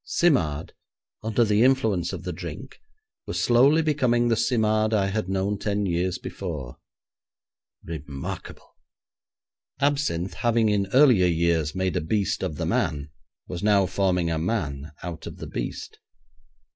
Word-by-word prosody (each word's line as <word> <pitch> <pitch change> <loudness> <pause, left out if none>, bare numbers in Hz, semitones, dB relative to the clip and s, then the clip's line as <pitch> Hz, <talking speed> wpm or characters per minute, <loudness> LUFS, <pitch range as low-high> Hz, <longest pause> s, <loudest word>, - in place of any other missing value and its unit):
Simard, 80 - +1 0.5
under 110 +2 +1
the 105 0 +2
influence 110 -10 +2
of - - -6
the - - -4
drink, - - -8 0.5
was - - -2
slowly 135 +7 +4
becoming 125 -6 +2
the 115 - +3
Simard 110 -2 +1
I 100 -2 +2
had 95 -2 -2
known 95 +1 -1
ten 105 -1 -1
years 90 0 0
before. 75 -10 -6 1.1
Remarkable! 75 -4 -7 1.0
Absinthe 140 - 0
having 115 -2 +2
in 100 -2 +1
earlier 125 -9 +6
years 85 -2 +1
made 95 -2 -1
a - - +1
beast 100 +6 -1
of 90 -5 -2
the - - -3
man 75 -2 -1 0.4
was 90 -1 -5
now 100 -2 +4
forming 90 -2 0
a 80 - -1
man 80 -6 -2
out 85 -2 -6
of - - -8
the - - -7
beast. - - -6
95 Hz, 140 wpm, -25 LUFS, 85-115 Hz, 1.1 s, earlier